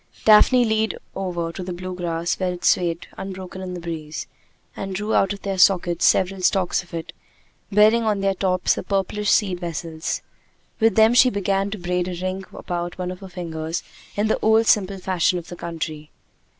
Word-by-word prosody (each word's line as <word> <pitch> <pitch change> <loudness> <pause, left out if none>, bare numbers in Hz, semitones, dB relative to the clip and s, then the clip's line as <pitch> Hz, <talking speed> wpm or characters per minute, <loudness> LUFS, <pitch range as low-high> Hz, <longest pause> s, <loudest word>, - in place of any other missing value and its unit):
Daphne 240 +3 +6
leaned 220 0 0 0.2
over 175 -3 -3
to 185 - -7
the 180 0 -5
blue 185 +1 -6
grass 170 -1 -2
where 185 -1 0
it 175 - -7
swayed 170 -2 +2
unbroken 190 -1 -7
in 180 -1 -5
the - - -5
breeze, 160 -2 -5 0.5
and 195 -1 -5
drew 210 +3 -2
out 195 - +3
of 200 -1 -6
their 195 -1 -2
sockets 175 -2 +4
several 190 0 +3
stalks 185 0 +2
of 175 - -19
it, 165 - -6 0.6
bearing 215 +3 +5
on 215 -3 0
their 195 0 +2
tops 185 -1 +1
the - - -4
purplish 200 +1 -1
seed 190 -5 +2
vessels. 165 -2 -4 0.6
With 225 0 +3
them 220 +1 +6
she 255 +1 +6
began 200 -1 0
to 215 - -5
braid 180 0 -1
a 180 -1 -4
ring 185 +1 -3
about 175 0 -5
one 180 -1 -3
of 185 - -8
her 195 - -10
fingers 165 -2 -4 0.3
in 205 - +1
the 220 - +1
old 220 +1 +4
simple 200 -3 +2
fashion 185 -1 +1
of 170 - -8
the 175 - -7
country. 160 -3 -5
185 Hz, 190 wpm, -22 LUFS, 175-200 Hz, 0.6 s, Daphne